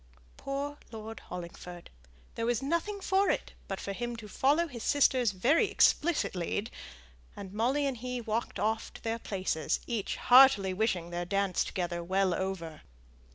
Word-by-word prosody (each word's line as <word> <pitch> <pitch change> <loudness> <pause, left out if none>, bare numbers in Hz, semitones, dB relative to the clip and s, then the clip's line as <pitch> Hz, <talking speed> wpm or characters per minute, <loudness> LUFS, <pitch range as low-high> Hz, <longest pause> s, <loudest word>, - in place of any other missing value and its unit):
Poor 285 +1 -4
Lord 225 0 -7
Hollingford! 175 0 -9 0.4
there 230 - -2
was 240 -2 +1
nothing 335 +8 -1
for 390 +1 +2
it - - -1
but 195 - -4
for 200 - -4
him 240 +3 -4
to 225 -2 -9
follow 290 - +2
his 245 -6 -8
sister's 260 -5 +3
very 275 - +2
explicit 345 -5 +3
lead, 190 +4 -3 0.6
and 195 -1 -8
Molly 255 +7 +1
and 270 -3 -1
he 250 +1 -4
walked 230 0 -3
off 220 +1 -1
to - - -10
their 230 0 -2
places, 185 -8 -1
each 225 -5 -2
heartily 250 -7 +6
wishing 185 -4 -1
their 175 0 -3
dance 195 0 +1
together 175 -2 -3
well 190 +1 +1
over. 170 -4 -4
220 Hz, 155 wpm, -30 LUFS, 190-270 Hz, 0.6 s, heartily